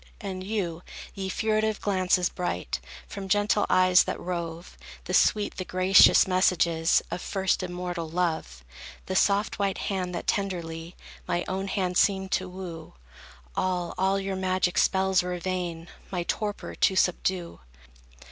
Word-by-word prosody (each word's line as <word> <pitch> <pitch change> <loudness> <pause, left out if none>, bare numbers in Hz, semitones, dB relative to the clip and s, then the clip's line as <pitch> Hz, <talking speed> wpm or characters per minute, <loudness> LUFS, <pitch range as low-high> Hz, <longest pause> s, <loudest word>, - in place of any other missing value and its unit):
And 190 -3 -5
you, 185 -5 -3 0.3
ye 190 -1 -4
furtive 215 +1 0
glances, 185 -2 +1
bright, 90 - -3 0.3
From 195 -1 -7
gentle 205 +1 +2
eyes 185 0 +5
that - - -3
rove, 170 -1 -5 0.3
The - - -5
sweet, 210 -1 +2
the 185 - -2
gracious 185 +1 +6
messages 175 -3 +2
Of 175 - -3
first 190 -1 0
immortal 175 -2 -4
Love; 160 - -2 0.4
The 185 - -3
soft, 205 +3 +2
white 195 -1 0
hand, 180 -3 -3
that - - -4
tenderly 170 -4 -3 0.3
My 175 - -1
own 195 +1 -3
hand 185 -2 -1
seemed 190 -1 +2
to 185 0 0
woo; 180 -3 -8 0.6
All, 180 -2 -1
all 190 +1 +1
your 195 0 -3
magic 185 -1 0
spells 190 -1 +3
were 180 0 -3
vain, 175 -2 -4 0.2
My 180 -2 -2
torpor 205 +3 -3
to 190 - +2
subdue. 180 -1 0
185 Hz, 140 wpm, -27 LUFS, 175-195 Hz, 0.6 s, gracious